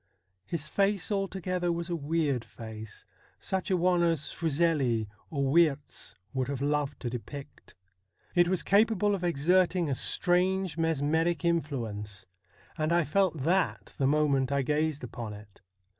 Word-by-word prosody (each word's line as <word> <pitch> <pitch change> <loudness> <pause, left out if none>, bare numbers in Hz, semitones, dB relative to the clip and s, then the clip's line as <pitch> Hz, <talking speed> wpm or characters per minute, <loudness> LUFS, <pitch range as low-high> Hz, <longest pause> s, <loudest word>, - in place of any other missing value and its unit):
His 160 -3 -3
face 200 +2 +1
altogether 185 -3 -1
was 170 0 -2
a 175 - -2
weird 150 -5 0
face; 110 -3 -9 0.3
such 190 -1 -2
a 185 - +3
one 180 0 +3
as 165 -4 +1
Fuseli 145 -8 +1 0.2
or 140 -3 0
Wiertz 155 -4 +1 0.2
would 130 -2 -1
have 140 -2 -3
loved 145 -1 -1
to 120 - -2
depict. 130 +4 -9 0.6
It 175 -1 +4
was 185 0 +1
capable 205 0 +3
of 190 -3 -2
exerting 175 +1 +2
a - - +2
strange 180 +3 +1
mesmeric 160 +1 +1
influence, 115 - -2 0.5
and 155 +1 +1
I 170 0 +4
felt 165 -3 +1
that 180 +4 0
the 135 - +3
moment 140 -2 +2
I 140 -1 +1
gazed 150 +1 0
upon 115 -3 -6
it. 105 -1 -14
160 Hz, 145 wpm, -29 LUFS, 135-175 Hz, 0.6 s, It